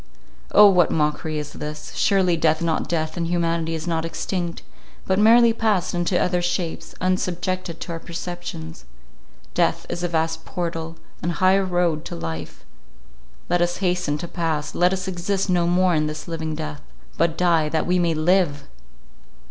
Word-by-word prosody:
O, 210 - +9
what 180 -3 +4
mockery 155 0 0
is 150 -1 -5
this! 150 +1 -7
Surely 190 -3 +3
death 160 -1 +2
is 170 - -5
not 165 -1 -1
death, 160 -1 -1
and 170 -1 -1
humanity 165 -1 0
is 160 0 -5
not 165 -2 -1
extinct; 170 +1 -3 0.4
but 190 +1 +1
merely 230 +2 +6
passed 210 -5 0
into 175 +1 +1
other 180 -1 +1
shapes, 175 -1 -3
unsubjected 185 -1 -1
to 175 - -6
our 165 - -4
perceptions. 170 - -7 0.7
Death - - +1
is 175 - -3
a 175 - 0
vast 160 -1 -1
portal, 165 -2 -4 0.3
an 170 - -1
high 185 +2 +3
road 175 -4 0
to - - -5
life: 80 -1 -6 0.8
let 175 - +1
us 175 0 +1
hasten 180 -5 0
to 170 - -5
pass; 165 -4 -2
let 180 +1 +3
us 190 0 -2
exist 190 +2 -1
no 175 -1 +2
more 180 +1 +3
in 155 -1 +1
this 155 0 -6
living 160 -2 -3
death, 75 - -6 0.3
but 165 0 +1
die 165 -4 +3
that 160 0 0
we 180 0 +2
may 170 -2 +1
live! 155 -2 +2
170 Hz, 170 wpm, -23 LUFS, 160-180 Hz, 0.8 s, O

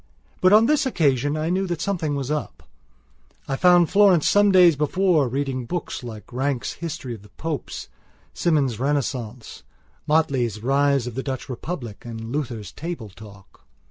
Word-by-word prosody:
But 185 - +5
on 215 +2 +7
this 290 +1 +2
occasion 145 - +1
I 155 +2 -1
knew 190 +1 0
that 175 -2 -3
something 165 -7 -1
was 140 0 -3
up. 150 -1 -4 0.8
I 135 - -1
found 175 +2 +4
Florence 195 -5 +5
some 205 0 +4
days 180 -4 +6
before, 155 0 +2
reading 130 -1 -3
books 175 +2 -4
like 115 0 -9
Ranke's 130 0 -1
History 145 -7 -6
of 110 - -10
the 105 - -17
Popes, 150 - -5 0.5
Symonds' 140 -9 +1
Renaissance, 125 -4 -3 0.5
Motley's 130 -9 +1
Rise 140 0 +2
of 125 - -5
the 130 - -3
Dutch 130 -1 -5
Republic 125 - -6
and 115 -1 -7
Luther's 120 -9 -4
Table 160 -9 -6
Talk. 100 0 -15
140 Hz, 155 wpm, -23 LUFS, 120-170 Hz, 0.8 s, on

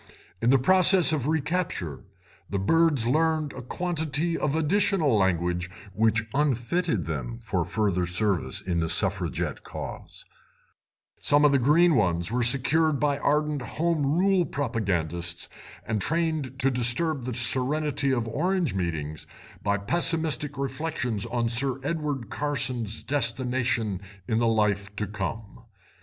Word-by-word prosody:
In 115 - +2
the 135 - +6
process 185 +4 +6
of 140 -4 -1
recapture 155 - -2 0.5
the 100 - -2
birds 150 +4 +2
learned 155 +3 +1
a 130 - -7
quantity 160 +2 -2
of 150 -2 -1
additional 160 - +2
language 90 -2 0 0.2
which 110 +2 +2
unfitted 140 - 0
them 65 -7 -4
for - - 0
further 100 -5 0
service 90 -7 +1
in 85 -2 -2
the 80 0 -1
Suffragette 90 -2 +2
cause; - - -8 0.9
some 145 +1 +3
of 145 - +5
the 140 - +3
green 160 +7 +4
ones 85 - +1
were 125 +1 0
secured 140 +5 +2
by 145 -1 +1
ardent 150 0 0
Home 165 +3 -1
Rule 180 +6 +2
propagandists 90 - -2 0.4
and 110 -2 -2
trained 160 - -1
to 135 0 +1
disturb 125 +3 0
the 125 -2 -4
serenity 140 +4 0
of 120 -4 0
Orange 170 - 0
meetings 80 -5 -3 0.3
by 100 0 0
pessimistic 155 +4 -1
reflections 135 -5 -3
on 120 -1 -1
Sir 125 +3 0
Edward 145 -6 -3
Carson's 125 -6 -2
destination 125 -5 -1 0.3
in 110 - +1
the 115 - +2
life 105 -2 0
to 105 - -2
come. 105 +3 -6
130 Hz, 130 wpm, -26 LUFS, 105-150 Hz, 0.9 s, the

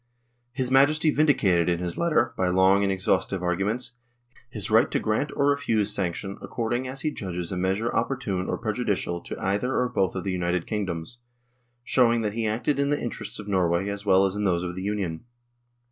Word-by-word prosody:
His 130 0 -2
Majesty 155 +4 +4
vindicated 100 - +3
in 85 - +1
his 90 0 -4
letter, 155 -8 +1
by 95 - 0
long 95 +2 +4
and 100 -1 +1
exhaustive 95 0 0
arguments, 100 +8 -1 0.6
his 110 -3 -4
right 110 +2 +5
to - - 0
grant 110 +7 0
or 140 - +2
refuse 110 -8 +1
sanction 95 0 -3
according 120 +2 -2
as 135 +1 -6
he 155 - -1
judges 90 - -5
a - - -2
measure 95 +5 0
opportune 115 -6 -1
or - - -1
prejudicial 105 -6 -2
to - - -7
either 105 +7 0
or 125 - +2
both 95 -7 0
of 95 - -3
the 95 - -2
united 90 -1 -1
kingdoms, 100 0 -4 0.6
showing 120 -2 +3
that 105 -2 -2
he 115 0 -1
acted 120 +7 0
in 140 0 +1
the 145 - +1
interests 120 - -5
of 105 - -8
Norway 95 -1 +1
as 100 0 -5
well 95 -1 +4
as 95 0 -1
in 105 - -2
those 90 -3 +1
of 90 -1 -4
the 95 - -5
Union. 95 -5 -3
100 Hz, 195 wpm, -26 LUFS, 95-120 Hz, 0.6 s, right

